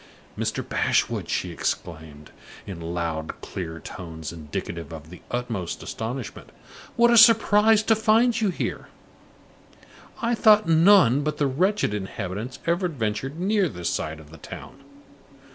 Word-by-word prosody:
"Mr. - - -3
Bashwood!" - - 0
she - - -2
exclaimed, 80 -3 -5 0.3
in 90 -4 -8
loud, 85 -2 -4
clear 85 -3 -6
tones 80 -1 -8
indicative 80 +1 -6
of 80 0 -10
the 90 - -12
utmost 115 -8 -4
astonishment, 120 +1 -6 0.5
"what 235 0 +5
a 235 - +5
surprise 220 -1 +6
to 225 - +4
find 225 +2 +3
you 210 - +2
here! 180 - -4 1.3
I 235 +1 0
thought 215 -2 +5
none 165 - +5
but 150 0 -2
the 145 - +1
wretched 180 - +1
inhabitants 105 +4 -5
ever 175 +2 +1
ventured 135 0 -3
near 195 -1 +1
this 90 -8 -3
side 80 0 -3
of 75 -1 -15
the 80 - -12
town. - - -11
125 Hz, 135 wpm, -24 LUFS, -, 1.3 s, surprise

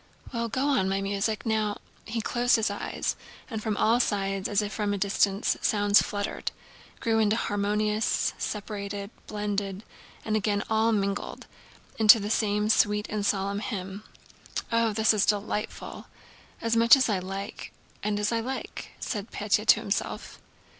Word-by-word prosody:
Well, 235 -1 -1
go 260 +5 -1
on, 260 -10 +2
my 195 0 0
music! 200 +3 -1
Now!..." 215 -2 0 0.3
He 225 +1 -3
closed 245 +2 +2
his 220 -3 +1
eyes, 205 - -2 0.4
and, 220 -1 -3
from 215 -1 -2
all 230 +2 +3
sides 195 -4 0
as 205 0 +2
if 205 - -4
from 205 -2 -1
a - - -3
distance, 200 0 +1
sounds 205 -1 +4
fluttered, 205 0 -3 0.5
grew 225 -1 +1
into 215 0 +3
harmonies, 210 +1 0
separated, 205 -1 -4 0.2
blended, 205 -1 -3 0.4
and 215 - 0
again 205 -1 +1
all 220 +1 +3
mingled 200 -2 -2 0.5
into 220 +1 +8
the 205 +1 -3
same 210 -1 +1
sweet 210 -1 +3
and 210 -1 -2
solemn 200 0 0
hymn. 195 -2 -5 0.7
"Oh, 230 -1 +3
this 220 +1 +3
is 210 -2 +2
delightful! 210 0 -2 0.6
As 230 0 +1
much 230 +2 +8
as 265 -2 +2
I 205 -4 +1
like 195 +3 -6 0.3
and 205 0 -1
as 210 +1 0
I 230 - +1
like!" 260 +3 -5
said 210 0 -4
Pétya 210 +1 0
to 220 - +6
himself. 205 -2 -3
210 Hz, 155 wpm, -27 LUFS, 200-220 Hz, 0.7 s, into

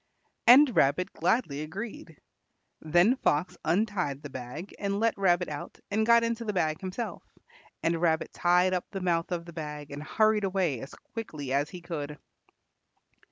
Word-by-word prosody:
And 255 +1 +8
Rabbit 145 +8 +2
gladly 165 - 0
agreed. 165 -1 -7 0.6
Then 175 - +4
Fox 155 - 0
untied 175 -5 0
the 145 - -8
bag 130 +9 -7
and 200 0 -1
let 230 0 +2
Rabbit 180 -2 +2
out 145 -1 -7
and 220 +2 +1
got 235 0 +6
into 230 0 -1
the 210 -2 -2
bag 155 -4 0
himself, 190 +5 -4 0.6
and 165 0 +1
Rabbit 160 -2 +1
tied 180 +1 +3
up 180 - -1
the 195 - -5
mouth 170 -1 0
of 170 -1 -2
the 170 - -10
bag 150 -2 -6
and 145 +1 -6
hurried 215 +6 +2
away 185 -9 0
as 135 - -9
quickly 155 - -6
as 145 +2 +1
he 180 -2 -9
could. 150 -4 -5
175 Hz, 160 wpm, -28 LUFS, 150-205 Hz, 0.6 s, And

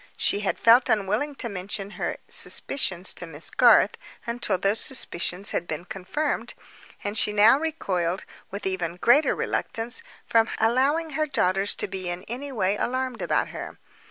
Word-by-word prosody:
She - - +1
had 205 - -1
felt 235 +2 +5
unwilling 215 +8 0
to 245 - -2
mention 200 0 -5
her - - -3
suspicions 190 -9 0
to 180 - -4
Miss 160 0 -3
Garth, - - +5 0.3
until 235 -5 -1
those 200 +4 +1
suspicions 195 -6 0
had 175 - -2
been 160 +3 -5
confirmed—and 205 0 -5
she 215 - +2
now 215 +6 +6
recoiled, 190 - -2 0.2
with 200 +2 -7
even 180 -3 -2
greater 240 +11 +4
reluctance, 230 +2 -2 0.2
from 225 -1 +3
allowing 275 +8 +2
her 310 +2 -1
daughters 195 -7 +1
to - - -2
be 185 -2 -4
in 175 +1 -4
any 265 +6 -6
way 200 -4 0
alarmed 255 0 -2
about - - 0
her. - - -8
210 Hz, 155 wpm, -25 LUFS, 185-255 Hz, 0.3 s, now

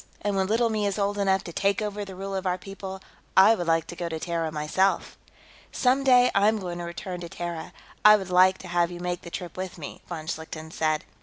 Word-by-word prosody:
And 205 -1 0
when 190 -1 +1
Little 230 +2 +2
Me 210 -2 0
is 200 - -2
old 205 0 0
enough 195 -1 +2
to 170 - -8
take 200 +2 +1
over 210 -1 -3
the 195 -2 -9
rule 195 +1 -5
of 190 -1 -2
our 180 0 +1
people, 190 0 -8 0.4
I 195 +4 +8
would 175 -6 -3
like 165 0 +2
to - - -8
go 170 -1 -4
to 160 -1 -4
Terra, 165 -1 -2
myself." 155 +6 0 0.6
"Some 265 +1 +2
day, 250 -2 +6
I 200 +1 +4
am 220 0 +3
going 175 -3 -5
to - - -4
return 180 +1 -6
to 170 - -7
Terra; 170 -2 -5 0.3
I 210 0 +9
would 190 -3 -4
like 185 +1 +5
to - - -7
have 175 -1 +1
you 175 -1 -8
make 175 0 -3
the 170 - -9
trip 175 0 -6
with 185 0 -5
me," 150 -4 -8
von 160 -3 -5
Schlichten 160 0 -6
said. 155 -2 0
185 Hz, 245 wpm, -26 LUFS, 170-200 Hz, 0.6 s, I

